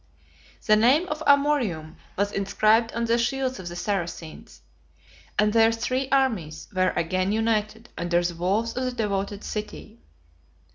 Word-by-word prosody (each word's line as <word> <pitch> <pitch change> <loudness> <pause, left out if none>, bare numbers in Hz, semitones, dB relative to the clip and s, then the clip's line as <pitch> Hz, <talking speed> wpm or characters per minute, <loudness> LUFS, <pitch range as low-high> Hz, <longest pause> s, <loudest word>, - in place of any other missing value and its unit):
The 215 - +5
name 260 +11 +4
of 305 +1 -4
Amorium 260 - +2 0.2
was 200 +1 0
inscribed 215 +4 +2
on 235 +1 -1
the 230 +1 +2
shields 260 +1 -1
of 185 - -7
the 175 - -6
Saracens; 175 -4 -5 0.8
and 210 0 +3
their 225 0 +5
three 255 +4 -2
armies 210 - 0
were 185 -1 +2
again 185 +3 0
united 220 +1 -1
under 175 0 0
the 175 0 -1
walls 195 +7 -1
of 255 +1 -1
the 255 - -2
devoted 200 -3 -2
city. 210 0 -7
215 Hz, 145 wpm, -25 LUFS, 185-240 Hz, 0.8 s, The